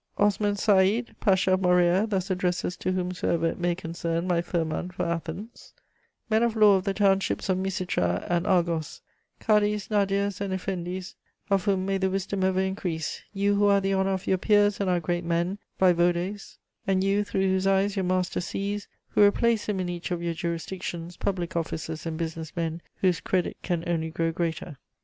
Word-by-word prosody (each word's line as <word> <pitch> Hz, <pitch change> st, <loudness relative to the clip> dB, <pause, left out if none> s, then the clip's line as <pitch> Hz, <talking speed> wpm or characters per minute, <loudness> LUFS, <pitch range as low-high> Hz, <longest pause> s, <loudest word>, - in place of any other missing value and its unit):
Osman 205 Hz, 0 st, +2 dB
Seïd, 205 Hz, +3 st, +3 dB
Pasha 190 Hz, -3 st, +3 dB
of 185 Hz, -, +2 dB
Morea, 180 Hz, +2 st, +3 dB
thus 195 Hz, -2 st, -1 dB
addresses 180 Hz, -1 st, -1 dB
to 185 Hz, -, -2 dB
whomsoever 180 Hz, -2 st, -1 dB
it 165 Hz, -, -1 dB
may 175 Hz, 0 st, +1 dB
concern 170 Hz, 0 st, -3 dB
my 175 Hz, -2 st, +1 dB
firman 170 Hz, 0 st, -2 dB
for 180 Hz, -, -3 dB
Athens: 170 Hz, +6 st, -5 dB, 0.5 s
"Men 220 Hz, -1 st, +2 dB
of 235 Hz, -1 st, +1 dB
law 210 Hz, -2 st, +6 dB
of 190 Hz, 0 st, -1 dB
the 195 Hz, -, 0 dB
townships 195 Hz, -1 st, +1 dB
of 185 Hz, 0 st, +2 dB
Misitra 180 Hz, -, -1 dB
and 175 Hz, 0 st, 0 dB
Argos, 170 Hz, -4 st, 0 dB, 0.4 s
cadis, 210 Hz, -1 st, +2 dB
nadirs, 200 Hz, -1 st, +1 dB
and 200 Hz, -1 st, -2 dB
eflendis, 185 Hz, -1 st, -4 dB, 0.4 s
of 195 Hz, -1 st, +2 dB
whom 190 Hz, -2 st, +1 dB
may 195 Hz, 0 st, 0 dB
the 190 Hz, 0 st, +1 dB
wisdom 195 Hz, 0 st, -2 dB
ever 190 Hz, 0 st, +2 dB
increase; 180 Hz, -5 st, -3 dB
you 200 Hz, 0 st, +1 dB
who 205 Hz, 0 st, +3 dB
are 200 Hz, 0 st, +5 dB
the 195 Hz, 0 st, 0 dB
honour 190 Hz, 0 st, +1 dB
of 190 Hz, 0 st, -4 dB
your 190 Hz, -, +1 dB
peers 205 Hz, 0 st, +3 dB
and 200 Hz, -2 st, 0 dB
our 180 Hz, -1 st, +2 dB
great 175 Hz, +1 st, -2 dB
men, 170 Hz, +4 st, -1 dB, 0.2 s
vaïvodes, 180 Hz, +2 st, +1 dB, 0.3 s
and 190 Hz, -1 st, +2 dB
you 200 Hz, +1 st, +2 dB
through 195 Hz, -, -2 dB
whose 190 Hz, 0 st, +1 dB
eyes 195 Hz, +1 st, +2 dB
your 195 Hz, -, 0 dB
master 180 Hz, 0 st, 0 dB
sees, 200 Hz, +3 st, -3 dB, 0.2 s
who -, -, +2 dB
replace 215 Hz, +2 st, +3 dB
him 200 Hz, -2 st, 0 dB
in 185 Hz, -, -1 dB
each 175 Hz, -1 st, -4 dB
of 175 Hz, -2 st, -2 dB
your 170 Hz, -1 st, -1 dB
jurisdictions, 170 Hz, 0 st, -4 dB
public 185 Hz, -2 st, -3 dB
officers 160 Hz, -1 st, -3 dB
and 160 Hz, -1 st, -3 dB
business 160 Hz, -1 st, -5 dB
men, 165 Hz, -1 st, -2 dB, 0.2 s
whose 180 Hz, -3 st, +3 dB
credit 185 Hz, -2 st, 0 dB
can 175 Hz, -2 st, -2 dB
only 165 Hz, -2 st, -1 dB
grow 165 Hz, +1 st, -1 dB
greater. 165 Hz, -3 st, -3 dB
185 Hz, 185 wpm, -26 LUFS, 170-195 Hz, 0.5 s, law